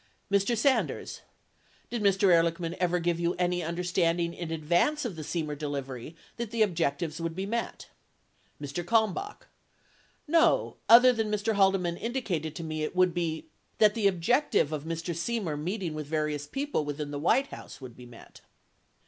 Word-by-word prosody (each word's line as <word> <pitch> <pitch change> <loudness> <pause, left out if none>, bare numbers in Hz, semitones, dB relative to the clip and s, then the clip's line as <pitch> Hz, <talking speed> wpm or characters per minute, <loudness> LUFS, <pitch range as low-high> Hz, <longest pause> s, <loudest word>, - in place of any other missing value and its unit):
Mr. 200 +4 +2
Sanders. 265 +4 0 0.7
Did 240 -2 -2
Mr. 195 -1 +3
Ehrlichman 170 0 +1
ever 180 -1 +1
give 170 -1 0
you 170 0 0
any 180 0 0
under 170 +2 -3
standing 170 -1 +1
in 170 -2 -6
advance 175 - +1
of 215 -7 -4
the 160 - -6
Semer 155 -1 -3
delivery 140 -1 -5 0.2
that 235 -2 -4
the 225 0 +2
objectives 165 -3 -1
would 165 -1 -3
be 190 +2 -3
met? 230 +3 -4 0.7
Mr. 145 +4 -4
Kalmbach. 225 - 0 0.8
No, 330 +2 +3
other 245 +2 +9
than 220 -2 -1
Mr. 210 +1 0
Haldeman 190 -4 +2
indicated 185 - -3
to 170 - -5
me 155 -1 -4
it 155 - -3
would 185 -1 +3
be 165 -2 -2 0.2
— - - -42
that 210 -1 +5
the 215 -3 +2
objective 185 - +2
of 155 -1 -4
Mr. 165 +1 -3
Semer 170 -1 -2
meeting 180 0 -3
with 155 -2 -5
various 150 -1 -2
people 275 - -2
within 145 0 -4
the 145 - -4
White 260 - +2
House - - -10
would 130 -4 -10
be 125 -1 -12
met. 120 -1 -15
175 Hz, 170 wpm, -28 LUFS, 155-210 Hz, 0.8 s, other